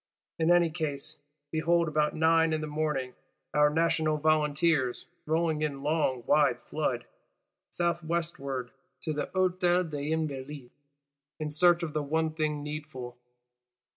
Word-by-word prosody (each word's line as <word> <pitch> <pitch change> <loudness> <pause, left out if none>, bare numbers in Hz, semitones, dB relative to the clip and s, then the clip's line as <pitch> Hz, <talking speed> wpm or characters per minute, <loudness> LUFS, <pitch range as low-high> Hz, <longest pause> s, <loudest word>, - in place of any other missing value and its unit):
In 160 0 +2
any 175 -2 +5
case, 155 -2 -4 0.3
behold 170 +1 +2
about 150 -1 +1
nine 160 0 +3
in 155 - -1
the - - -2
morning, 150 -4 -2 0.4
our 150 +1 +5
National 160 0 +1
Volunteers 150 -3 +1 0.2
rolling 160 -1 +1
in 140 -3 -2
long 145 -5 0
wide - - +3
flood, - - -2 0.6
south 170 -1 -1
westward 140 -6 -3 0.3
to 155 - -2
the 150 - -2
Hôtel 180 -2 +1
des 145 0 -3
Invalides; 145 -4 -4 0.7
in 155 -1 -3
search 175 +2 +4
of 155 -3 -3
the 155 - 0
one 160 +2 0
thing 155 -2 -1
needful. 150 -5 -6
155 Hz, 135 wpm, -29 LUFS, 150-165 Hz, 0.7 s, any